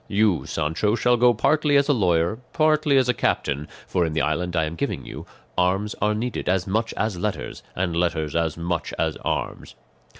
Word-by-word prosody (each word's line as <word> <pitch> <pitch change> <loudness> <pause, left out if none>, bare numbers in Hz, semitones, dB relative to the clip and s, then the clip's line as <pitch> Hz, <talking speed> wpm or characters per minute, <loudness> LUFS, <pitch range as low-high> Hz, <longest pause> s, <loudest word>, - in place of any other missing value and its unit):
You, 100 -4 +1
Sancho, 80 +8 0
shall 120 +1 +3
go 120 +1 +5
partly 150 +5 +3
as 140 - +3
a 145 - +4
lawyer, 90 -2 +1
partly 155 -2 +3
as 130 -2 +3
a 125 - +3
captain, 75 - -1 0.2
for, 90 - 0
in 80 -2 -1
the 80 - +1
island 85 +4 -1
I 80 - +2
am 80 +1 -3
giving 85 - -3
you, - - -8 0.3
arms 95 +4 +1
are 105 +1 +2
needed 115 -3 -3
as 90 -1 +1
much 110 +4 -1
as 110 -5 -1
letters, 105 +1 -3
and 90 -2 -1
letters 85 -3 -1
as 85 -1 0
much 85 0 -3
as - - 0
arms." - - -4
95 Hz, 195 wpm, -23 LUFS, 85-115 Hz, 0.3 s, go